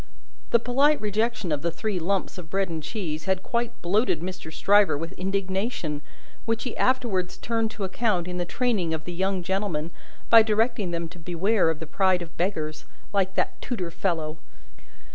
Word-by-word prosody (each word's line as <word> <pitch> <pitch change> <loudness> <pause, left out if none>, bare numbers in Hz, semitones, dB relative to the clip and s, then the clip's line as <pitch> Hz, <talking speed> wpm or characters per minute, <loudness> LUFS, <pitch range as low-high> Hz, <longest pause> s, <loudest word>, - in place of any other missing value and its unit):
The - - +6
polite 270 +6 +3
rejection 215 -2 0
of 145 -2 0
the 170 - +1
three 195 +3 -2
lumps 190 +2 -1
of 165 -3 -9
bread 195 +1 0
and 160 -1 -3
cheese 160 -3 -4
had 190 -1 0
quite 235 0 -2
bloated 190 -1 +2
Mr. 180 -2 -6
Stryver 200 -1 +4
with 165 +3 -4
indignation, 190 -4 -2 0.4
which 230 0 0
he 250 - -4
afterwards 215 -9 +1
turned 225 -1 0
to 215 - -6
account 190 -2 0
in 180 0 -3
the - - +1
training 190 -5 0
of 160 0 -7
the 175 - -5
young 190 +1 0
gentlemen, 175 -4 -1 0.4
by 230 -1 +10
directing 220 -1 +1
them 170 -1 -2
to 180 +1 -13
beware 180 +3 +2
of 160 - 0
the 160 - -6
pride 185 +2 +2
of 165 - -12
Beggars, 155 -4 -2 0.3
like 195 -1 +1
that - - -1
tutor 185 -9 -3
fellow. 160 -3 -1
190 Hz, 180 wpm, -26 LUFS, 170-215 Hz, 0.4 s, by